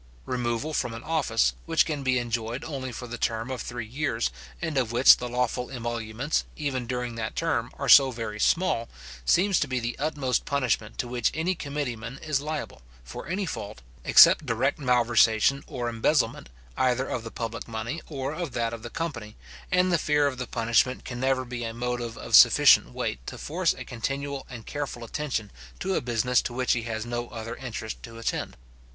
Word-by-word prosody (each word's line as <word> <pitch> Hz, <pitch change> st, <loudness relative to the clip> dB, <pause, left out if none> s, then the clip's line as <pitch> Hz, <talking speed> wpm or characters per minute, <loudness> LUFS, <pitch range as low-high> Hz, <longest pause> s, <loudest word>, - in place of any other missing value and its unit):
Removal 120 Hz, +4 st, -2 dB
from 120 Hz, -5 st, -1 dB
an 115 Hz, -, -8 dB
office, 155 Hz, -8 st, +1 dB
which 165 Hz, -1 st, +3 dB
can 150 Hz, -3 st, -3 dB
be 130 Hz, -1 st, +2 dB
enjoyed 120 Hz, 0 st, -2 dB
only 135 Hz, -4 st, -5 dB
for 125 Hz, -, -7 dB
the 120 Hz, 0 st, -7 dB
term 115 Hz, +3 st, -1 dB
of 130 Hz, -, -3 dB
three 120 Hz, -2 st, -5 dB
years, 120 Hz, -1 st, -1 dB, 0.3 s
and 160 Hz, -3 st, -3 dB
of 125 Hz, -4 st, +1 dB
which 120 Hz, +2 st, +7 dB
the 125 Hz, -, -5 dB
lawful 125 Hz, 0 st, -1 dB
emoluments, 120 Hz, +2 st, -2 dB
even 130 Hz, -5 st, -3 dB
during 125 Hz, -1 st, -3 dB
that 110 Hz, -2 st, -4 dB
term, -, -, -1 dB
are -, -, -3 dB
so 135 Hz, -2 st, +9 dB
very 115 Hz, -4 st, -5 dB
small, 140 Hz, -, +2 dB, 0.4 s
seems 190 Hz, -, +4 dB
to 145 Hz, -, 0 dB
be 130 Hz, -1 st, -1 dB
the 120 Hz, +1 st, -3 dB
utmost 145 Hz, -4 st, 0 dB
punishment 125 Hz, -6 st, -1 dB
to 125 Hz, -, -2 dB
which 120 Hz, -1 st, +1 dB
any 165 Hz, +4 st, +1 dB
committee 145 Hz, -6 st, -3 dB
man 115 Hz, +4 st, -8 dB
is 150 Hz, -3 st, 0 dB
liable, 155 Hz, -, -5 dB, 0.2 s
for 65 Hz, -, -8 dB
any 190 Hz, +3 st, -1 dB
fault, 100 Hz, -, -6 dB, 0.2 s
except -, -, +8 dB
direct -, -, 0 dB
malversation, 120 Hz, 0 st, +3 dB
or 125 Hz, -5 st, -4 dB
embezzlement, 115 Hz, -, +1 dB, 0.3 s
either 130 Hz, 0 st, +1 dB
of 120 Hz, -, -3 dB
the 115 Hz, -, -6 dB
public 115 Hz, 0 st, -5 dB
money, 115 Hz, +8 st, -4 dB
or 140 Hz, -1 st, -4 dB
of 165 Hz, -5 st, -4 dB
that 115 Hz, -1 st, -1 dB
of 115 Hz, -, -6 dB
the 120 Hz, -, -7 dB
company; 120 Hz, -11 st, -5 dB, 0.4 s
and 180 Hz, 0 st, +3 dB
the 170 Hz, -, +3 dB
fear 150 Hz, -1 st, +2 dB
of 135 Hz, -2 st, -1 dB
the 125 Hz, -, -3 dB
punishment 115 Hz, +2 st, +1 dB
can 120 Hz, -1 st, -5 dB
never 130 Hz, 0 st, +1 dB
be 120 Hz, -1 st, -5 dB
a 115 Hz, 0 st, -4 dB
motive 120 Hz, -1 st, -3 dB
of -, -, +1 dB
sufficient 60 Hz, -, +7 dB
weight 60 Hz, -, -3 dB
to -, -, -6 dB
force -, -, 0 dB
a -, -, -8 dB
continual 135 Hz, +3 st, -4 dB
and 120 Hz, -4 st, -9 dB
careful 140 Hz, -5 st, -5 dB
attention 115 Hz, -4 st, -3 dB, 0.3 s
to 190 Hz, +1 st, -2 dB
a -, -, +1 dB
business 120 Hz, +1 st, +2 dB
to 120 Hz, -, -5 dB
which 130 Hz, +1 st, 0 dB
he 115 Hz, -, -1 dB
has 115 Hz, -1 st, -4 dB
no 120 Hz, 0 st, -4 dB
other 115 Hz, 0 st, -6 dB
interest 110 Hz, -4 st, -6 dB
to 115 Hz, -1 st, -10 dB
attend. 115 Hz, -, -3 dB
125 Hz, 195 wpm, -27 LUFS, 115-140 Hz, 0.4 s, so